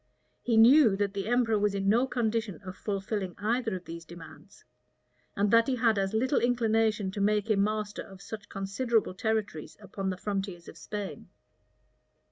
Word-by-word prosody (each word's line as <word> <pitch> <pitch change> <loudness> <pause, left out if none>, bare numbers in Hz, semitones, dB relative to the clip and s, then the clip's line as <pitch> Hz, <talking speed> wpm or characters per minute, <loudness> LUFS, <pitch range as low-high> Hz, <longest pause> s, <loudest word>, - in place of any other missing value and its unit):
He 230 -2 +1
knew 235 -1 +7
that 200 0 -1
the 195 0 -4
emperor 230 -3 +2
was 205 -1 +1
in 195 0 -1
no 235 +6 +3
condition 225 -5 -1
of 185 0 -7
fulfilling 195 -2 -3
either 225 +1 -1
of 180 -1 -8
these 165 0 -8
demands; 170 0 -14 0.7
and 200 +1 +1
that 230 0 +5
he 265 - +1
had 225 -4 +2
as 195 0 0
little 260 +5 +2
inclination 225 -4 +1
to 200 - -4
make 210 +1 +1
him 200 -2 +3
master 210 0 -2
of 195 -1 -12
such 205 +1 -9
considerable 205 +2 -1
territories 205 -5 -3
upon 195 -1 -5
the 185 - -3
frontiers 195 -3 -4
of - - -10
Spain. 200 +5 -7
210 Hz, 170 wpm, -29 LUFS, 195-225 Hz, 0.7 s, knew